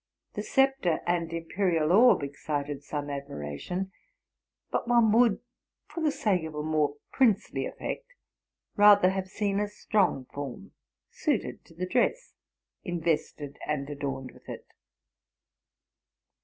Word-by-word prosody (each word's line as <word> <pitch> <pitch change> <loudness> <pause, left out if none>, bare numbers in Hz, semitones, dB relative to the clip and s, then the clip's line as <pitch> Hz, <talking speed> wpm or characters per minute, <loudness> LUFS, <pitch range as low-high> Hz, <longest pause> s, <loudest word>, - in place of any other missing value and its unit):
The - - -3
sceptre 270 - +2
and 170 -1 0
impe 165 0 -6
rial 170 -5 +2
orb 225 - +6
excited 145 0 -4
some 145 -1 -4
admiration; 140 - -5 0.8
but - - -1
one 235 -2 +5
would, 230 -2 +4 0.4
for 335 - -7
the 310 - +3
sake 215 - 0
of 160 -1 -7
a 150 - -3
more 155 -2 +1 0.2
princely 230 -7 +2
effect, - - -5 0.7
rather 205 -2 +7
have 190 -1 -3
seen 200 +1 -1
a 210 - 0
strong 200 -9 0
form, 140 -3 -6 0.4
suited - - -2
to 165 - -19
the 180 +2 -2
dress, 255 - 0 0.5
invested 160 -5 -2
and 145 -2 -1
adorned 135 -2 -4
with - - -17
it. - - -7
175 Hz, 130 wpm, -28 LUFS, 145-210 Hz, 0.8 s, rather